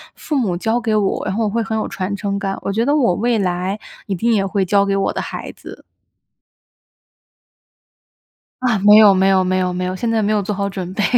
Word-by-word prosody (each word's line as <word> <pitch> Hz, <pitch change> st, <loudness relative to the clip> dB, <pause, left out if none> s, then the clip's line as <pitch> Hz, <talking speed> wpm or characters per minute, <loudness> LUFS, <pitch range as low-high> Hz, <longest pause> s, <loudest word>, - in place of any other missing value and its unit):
父 300 Hz, -, -4 dB
母 195 Hz, -9 st, 0 dB
教 225 Hz, +6 st, 0 dB
给 225 Hz, -3 st, 0 dB
我， 205 Hz, -2 st, 0 dB
然 190 Hz, -, -2 dB
后 225 Hz, -, 0 dB
我 210 Hz, -, 0 dB
会 230 Hz, +2 st, -1 dB
很 220 Hz, 0 st, -3 dB
有 215 Hz, -, -2 dB
传 190 Hz, +1 st, -4 dB
承 200 Hz, 0 st, -3 dB
感， 195 Hz, -1 st, -3 dB
我 195 Hz, -, -2 dB
觉 225 Hz, +2 st, +1 dB
得 285 Hz, -, +2 dB
我 250 Hz, -11 st, +2 dB
未 235 Hz, +2 st, 0 dB
来 185 Hz, +2 st, -2 dB, 0.3 s
一 195 Hz, -, -2 dB
定 230 Hz, +7 st, 0 dB
也 200 Hz, -, +2 dB
会 195 Hz, 0 st, -1 dB
教 200 Hz, +2 st, +3 dB
给 195 Hz, -, 0 dB
我 195 Hz, -, 0 dB
的 -, -, -3 dB
孩 -, -, -6 dB
子。 -, -, -12 dB, 2.8 s
啊， 240 Hz, -5 st, +1 dB
没 210 Hz, +2 st, +7 dB
有， 210 Hz, -2 st, +7 dB
没 190 Hz, 0 st, +2 dB
有， 190 Hz, -1 st, +3 dB
没 185 Hz, 0 st, 0 dB
有， 180 Hz, -1 st, -1 dB
没 180 Hz, 0 st, -3 dB
有， 185 Hz, -, -3 dB
现 230 Hz, +5 st, -2 dB
在 225 Hz, -1 st, +1 dB
没 210 Hz, -, 0 dB
有 210 Hz, -1 st, +1 dB
做 200 Hz, +1 st, -3 dB
好 200 Hz, 0 st, -2 dB
准 185 Hz, -2 st, -6 dB
备。 205 Hz, -, -1 dB
200 Hz, 250 characters per minute, -18 LUFS, 190-220 Hz, 2.8 s, 没